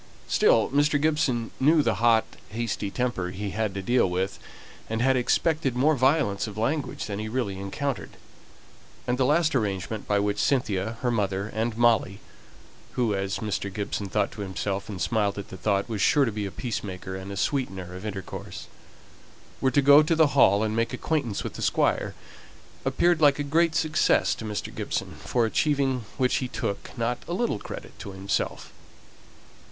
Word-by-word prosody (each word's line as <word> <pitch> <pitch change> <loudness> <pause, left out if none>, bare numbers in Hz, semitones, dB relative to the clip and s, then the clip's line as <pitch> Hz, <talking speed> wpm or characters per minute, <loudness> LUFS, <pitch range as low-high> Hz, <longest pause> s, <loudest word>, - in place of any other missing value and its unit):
Still 110 - +4
Mr. 145 +1 +3
Gibson 145 -6 +1
knew 150 +3 +4
the 115 -6 +1
hot 115 -2 +5 0.2
hasty 110 -2 -3
temper 120 -6 -2
he 100 +2 -5
had 110 -2 -2
to 95 - -4
deal 120 -2 +3
with, 95 +2 -2 0.5
and 110 0 -1
had 130 +2 +3
expected 135 +2 +1
more 145 +5 +3
violence 130 -6 +2
of 105 -1 -8
language 140 +7 -1
than 100 -1 -4
he 110 0 -4
really 110 -5 -2
encountered; 120 +7 -4 0.9
and 125 +1 -1
the 130 - +3
last 160 +2 +3
arrangement 105 -3 -2
by 105 - +2
which 100 0 0
Cynthia, 110 -5 0
her 125 - +1
mother, 100 -2 -1
and 110 +1 -1
Molly 115 -4 +3 0.7
who, 120 -4 +1
as 95 0 -2
Mr. 100 -1 -2
Gibson 100 0 -3
thought 105 +1 0
to 105 - -8
himself, 100 +1 -3
and 100 -3 -6
smiled 105 +2 0
at 100 - -6
the - - -8
thought, 100 +2 0
was 110 -4 -3
sure 145 +6 +4
to 115 - -1
be 105 -1 -3
a - - -7
peacemaker, 95 -4 -5
and 95 +1 -7
a 100 - -5
sweetener 95 -10 -2
of 95 +2 -8
intercourse 100 -3 -6 1.0
were 130 - +3
to 140 +2 +2
go 140 +2 +8
to 155 +2 +1
the 160 -1 +5
Hall 105 -6 +5
and 110 0 -1
make 115 +2 0
acquaintance 125 -5 -1
with - - -5
the - - -8
Squire, - - +1 0.7
appeared 175 -2 +2
like 145 -2 +5
a 145 - -1
great 160 +3 +2
success 160 -1 +2
to 110 - -7
Mr. 105 -1 -4
Gibson, - - -4
for 120 -2 +1
achieving 135 0 +1
which 130 -2 +2
he 130 - -2
took 100 -4 -4
not 120 +1 -1
a 170 - -3
little 210 - 0
credit - - -9
to 100 - -7
himself. 95 +1 -3
115 Hz, 180 wpm, -26 LUFS, 100-135 Hz, 1.0 s, go